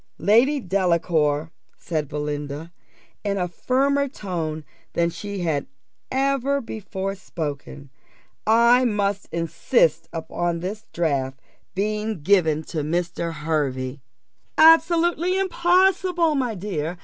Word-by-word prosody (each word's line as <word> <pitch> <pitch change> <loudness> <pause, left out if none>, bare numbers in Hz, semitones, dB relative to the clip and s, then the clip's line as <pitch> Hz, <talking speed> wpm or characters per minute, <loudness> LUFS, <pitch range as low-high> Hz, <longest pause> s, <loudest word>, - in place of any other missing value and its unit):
"Lady 235 - +4
Delacour," 170 - +1 0.3
said 155 -3 -3
Belinda, 150 +2 -4 0.5
in 200 -1 -1
a 180 -2 0
firmer 275 +9 +1
tone 165 - -4 0.3
than 170 0 +1
she 200 +1 -6
had 155 -5 -1 0.4
ever 275 +1 +1
before 195 -5 -5
spoken, 145 -6 -6 0.6
"I 235 +3 +5
must 205 -4 0
insist 165 - +1
upon 170 +1 -2
this 210 +5 -6
draft 135 -5 -1 0.4
being 210 -2 -2
given 160 -4 +3
to 160 - -1
Mr. 170 +2 -2
Hervey." 140 -4 -2 0.6
"Absolutely 340 +2 +5
impossible, 365 -2 +2
my 250 -6 -1
dear. 175 -3 -3
185 Hz, 100 wpm, -23 LUFS, 160-250 Hz, 0.6 s, I